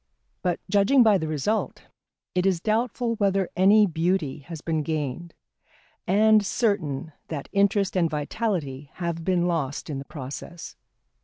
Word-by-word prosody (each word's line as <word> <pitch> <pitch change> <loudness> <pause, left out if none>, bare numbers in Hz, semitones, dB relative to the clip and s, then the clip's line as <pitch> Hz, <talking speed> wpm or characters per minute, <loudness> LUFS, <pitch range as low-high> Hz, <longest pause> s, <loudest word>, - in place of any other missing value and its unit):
But 180 -2 0
judging 205 +7 +4
by 210 -4 +5
the 160 - -3
result, 155 +9 -2 0.5
it 180 +1 +1
is 185 -3 +2
doubtful 230 +3 0
whether 195 -2 +1
any 205 +4 +6
beauty 165 -4 -1
has 160 +3 -8
been 160 0 -1
gained, 155 +1 -4 0.7
and 215 +3 +5
certain 180 - -1 0.2
that 145 -4 -6
interest 200 -1 +2
and 170 -3 +2
vitality 150 - -3
have 170 -2 -3
been 180 -1 +1
lost 155 -4 -2
in 140 - -3
the 135 - -8
process. 145 +4 -8
175 Hz, 140 wpm, -25 LUFS, 155-200 Hz, 0.7 s, any